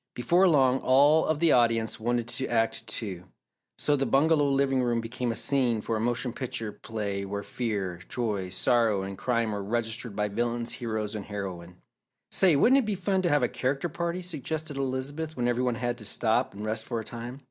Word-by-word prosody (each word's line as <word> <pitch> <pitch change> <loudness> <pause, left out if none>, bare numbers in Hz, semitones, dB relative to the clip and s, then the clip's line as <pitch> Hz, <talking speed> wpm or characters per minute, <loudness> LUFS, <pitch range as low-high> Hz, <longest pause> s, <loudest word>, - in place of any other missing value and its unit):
Before 175 +10 +3
long, 135 -5 +4
all 145 +4 +4
of 155 - +1
the 165 0 +3
audience 115 -2 +2
wanted 120 +1 -1
to 130 +2 -3
act 115 -1 0
too, 100 -5 -5 0.5
so 145 - +2
the 135 -1 0
bungalow 145 +1 +3
living 135 -1 +2
room 120 -1 +1
became 120 +1 -3
a - - -3
scene 125 -5 +2
for 115 +2 -2
a - - -1
motion 120 +1 -1
picture 115 -4 -4
play 100 -3 -4
where 100 +1 -4
fear, 100 -7 -3
joy, 105 -6 -2
sorrow 110 0 +2
and 100 0 -5
crime 115 +1 0
were 100 -1 -3
registered 115 0 -3
by 105 0 0
villains, 120 +3 -2
hero 110 -3 -2
and 105 -2 -5
heroine. 90 -4 -7 0.5
"Say, 185 -5 +5
wouldn't 255 - +5
it - - +1
be 210 -2 -1
fun 190 0 0
to 175 - +1
have 145 -4 +3
a - - +4
character 135 +8 -2
party," 170 +3 -3
suggested 155 -2 -4
Elizabeth, 135 +4 -3
when 120 -1 0
every 120 0 +1
one 125 -2 +1
had 120 +1 -2
to 105 - -9
stop 115 +2 0
and 105 +1 -6
rest 110 +1 -1
for 115 -1 -3
a - - -5
time. 120 +2 -7
120 Hz, 200 wpm, -28 LUFS, 110-140 Hz, 0.5 s, Say